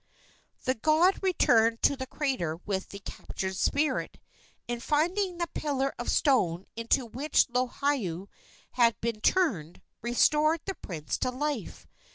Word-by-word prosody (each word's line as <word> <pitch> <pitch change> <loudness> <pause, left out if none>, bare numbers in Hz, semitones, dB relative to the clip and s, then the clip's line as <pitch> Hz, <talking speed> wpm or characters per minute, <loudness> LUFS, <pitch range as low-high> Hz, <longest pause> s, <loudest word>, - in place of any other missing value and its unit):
The 255 - +2
god 315 - +3
returned 230 - +3
to 280 - +4
the 260 -1 -6
crater 255 - -2
with 190 -2 -3
the 200 - -8
captured 190 -1 -5
spirit, 290 +10 0 0.5
and, 240 0 -3
finding 350 +7 0
the 345 - 0
pillar 275 -2 -1
of 240 - -3
stone 190 - +2
into 230 +3 +1
which 265 +7 +1
Lohiau 245 - -1 0.4
had 235 -4 +3
been 225 -2 -3
turned, 210 - +1 0.2
restored 300 +7 +3
the 390 - -2
prince 160 - -5
to - - 0
life. 265 -3 -4
255 Hz, 135 wpm, -28 LUFS, 215-300 Hz, 0.5 s, to